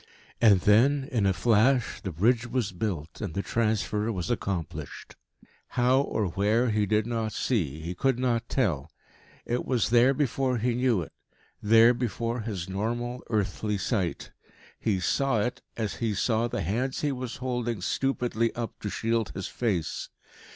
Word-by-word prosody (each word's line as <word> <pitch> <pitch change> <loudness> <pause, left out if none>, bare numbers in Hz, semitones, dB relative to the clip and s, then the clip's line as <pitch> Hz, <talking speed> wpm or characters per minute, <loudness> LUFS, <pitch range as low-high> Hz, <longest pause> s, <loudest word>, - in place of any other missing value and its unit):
And 105 -5 +6
then, 130 +8 +4
in 110 -6 +2
a - - +4
flash, 120 +5 +2
the 95 - -4
bridge 115 +8 +2
was 120 -4 -1
built, 90 -5 -4
and 100 -6 -4
the 100 - -1
transfer 110 -1 0
was 90 -6 -3
accomplished. 80 -6 -4 0.6
How 125 +2 +4
or 110 -6 -1
where 110 +6 +2
he 105 -1 +1
did 105 +1 +2
not 115 -2 -2
see, 80 - -1
he 85 +3 -4
could 130 +7 +1
not 120 -2 0
tell. 85 - 0 0.6
It 120 +1 -1
was 120 -4 0
there 125 +3 +5
before 130 -2 0
he 120 +2 0
knew 120 -6 +1
it - - -11 0.5
there 115 +3 +6
before 120 0 -2
his 105 -5 -4
normal, 120 +6 -3
earthly 105 -1 -1
sight. 95 -4 -2 0.5
He 105 -4 0
saw 135 +4 +1
it, 120 +4 -2 0.2
as 110 -3 -2
he 110 -3 -1
saw 115 +3 +1
the 110 - -3
hands 120 - -1
he 145 - +1
was 130 -2 -5
holding 120 -3 -2
stupidly 120 +1 0
up 115 -1 -5
to 105 - -4
shield 115 0 0
his 95 - -4
face. 95 -10 -2
115 Hz, 160 wpm, -27 LUFS, 100-125 Hz, 0.6 s, And